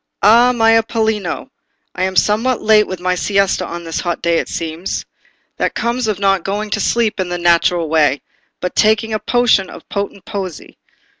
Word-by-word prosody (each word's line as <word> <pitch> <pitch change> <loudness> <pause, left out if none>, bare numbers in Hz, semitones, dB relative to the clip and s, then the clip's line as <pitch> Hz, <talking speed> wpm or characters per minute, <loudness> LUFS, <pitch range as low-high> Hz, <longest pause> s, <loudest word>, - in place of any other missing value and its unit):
"Ah, 235 +4 +6
my 225 -2 +3
Apollino! 220 -4 0 0.4
I 185 - -1
am 190 0 -3
somewhat 225 +6 +2
late 215 -1 +4
with 185 -1 -5
my 180 +1 0
siesta 195 -1 0
on 170 0 -7
this 165 -1 -4
hot 175 -1 -2
day, 170 0 +1
it - - -4
seems. 165 +2 -4 0.5
That - - -1
comes 235 0 -1
of 210 -3 -1
not 195 -2 +1
going 205 +2 -3
to 215 - 0
sleep 220 0 0
in 185 -1 -2
the 175 - -2
natural 170 -1 +2
way, 150 -3 +2 0.4
but 180 - -3
taking 220 +1 +2
a 215 - 0
potion 240 -6 +2
of - - -12
potent 200 -1 -4
poesy. 195 -7 -7
200 Hz, 180 wpm, -17 LUFS, 175-220 Hz, 0.5 s, Ah